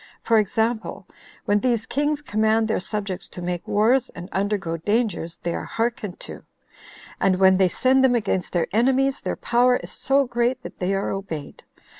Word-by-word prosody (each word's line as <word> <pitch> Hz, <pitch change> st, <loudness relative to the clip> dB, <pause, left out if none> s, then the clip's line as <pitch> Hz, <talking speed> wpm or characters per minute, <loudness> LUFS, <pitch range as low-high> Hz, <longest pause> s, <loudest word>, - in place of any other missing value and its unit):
For 225 Hz, -1 st, +4 dB
example, 220 Hz, -1 st, -1 dB, 0.4 s
when 205 Hz, 0 st, +3 dB
these 235 Hz, -1 st, 0 dB
kings 295 Hz, +1 st, -1 dB
command 220 Hz, -2 st, +2 dB
their 220 Hz, -, 0 dB
subjects 195 Hz, -1 st, -4 dB
to -, -, -9 dB
make 175 Hz, -1 st, -3 dB
wars, 235 Hz, +5 st, +2 dB
and 180 Hz, +2 st, -8 dB
undergo 195 Hz, -4 st, -1 dB
dangers, 205 Hz, -2 st, -1 dB
they 170 Hz, -, -1 dB
are -, -, -3 dB
hearkened 225 Hz, -5 st, -3 dB
to; -, -, -7 dB, 0.8 s
and 185 Hz, -1 st, +2 dB
when 190 Hz, 0 st, +5 dB
they 190 Hz, -1 st, +4 dB
send 260 Hz, +7 st, +3 dB
them 255 Hz, -2 st, +4 dB
against 195 Hz, -5 st, -1 dB
their 175 Hz, -2 st, +1 dB
enemies, 265 Hz, +4 st, +2 dB
their -, -, -2 dB
power 245 Hz, +1 st, +3 dB
is -, -, -5 dB
so 275 Hz, +1 st, +2 dB
great 245 Hz, +1 st, -1 dB
that -, -, -10 dB
they 190 Hz, +2 st, 0 dB
are 195 Hz, -, -1 dB
obeyed. 165 Hz, -7 st, -6 dB
215 Hz, 175 wpm, -23 LUFS, 190-245 Hz, 0.8 s, when